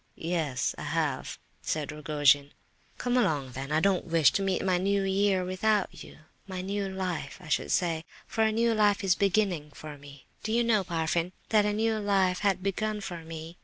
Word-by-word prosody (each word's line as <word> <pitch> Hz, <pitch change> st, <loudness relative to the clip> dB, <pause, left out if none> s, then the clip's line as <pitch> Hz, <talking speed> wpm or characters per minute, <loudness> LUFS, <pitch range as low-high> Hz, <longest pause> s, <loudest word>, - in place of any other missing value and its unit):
"Yes, 155 Hz, -8 st, -1 dB
I -, -, -5 dB
have," -, -, -2 dB, 0.2 s
said 150 Hz, -2 st, -2 dB
Rogojin. 145 Hz, -2 st, +2 dB, 0.4 s
"Come 245 Hz, 0 st, -1 dB
along, 145 Hz, -, +1 dB
then. 135 Hz, +3 st, -6 dB
I 155 Hz, -, +3 dB
don't 195 Hz, +1 st, +2 dB
wish 165 Hz, -3 st, +5 dB
to -, -, 0 dB
meet 190 Hz, -1 st, 0 dB
my 185 Hz, -2 st, +2 dB
new 200 Hz, +1 st, +1 dB
year 195 Hz, -1 st, +2 dB
without 195 Hz, +2 st, 0 dB
you—my 180 Hz, +4 st, -10 dB
new 200 Hz, 0 st, -2 dB
life, 185 Hz, -6 st, -4 dB
I -, -, -12 dB
should -, -, 0 dB
say, 165 Hz, -3 st, +1 dB, 0.2 s
for 225 Hz, -, 0 dB
a 220 Hz, -, +3 dB
new 230 Hz, +1 st, +2 dB
life 210 Hz, -1 st, +3 dB
is 190 Hz, -2 st, +4 dB
beginning 190 Hz, -5 st, +1 dB
for 150 Hz, -2 st, -9 dB
me. 140 Hz, -1 st, -14 dB, 0.2 s
Did 220 Hz, -, -2 dB
you 235 Hz, +1 st, +3 dB
know, 220 Hz, -4 st, +3 dB
Parfen, 170 Hz, 0 st, -1 dB, 0.2 s
that 210 Hz, -2 st, +4 dB
a 210 Hz, -, 0 dB
new 220 Hz, +1 st, +1 dB
life 195 Hz, -3 st, +2 dB
had 195 Hz, -3 st, +1 dB
begun 210 Hz, +2 st, -1 dB
for 175 Hz, -4 st, -6 dB
me?" 160 Hz, +1 st, -8 dB
185 Hz, 190 wpm, -28 LUFS, 160-205 Hz, 0.4 s, wish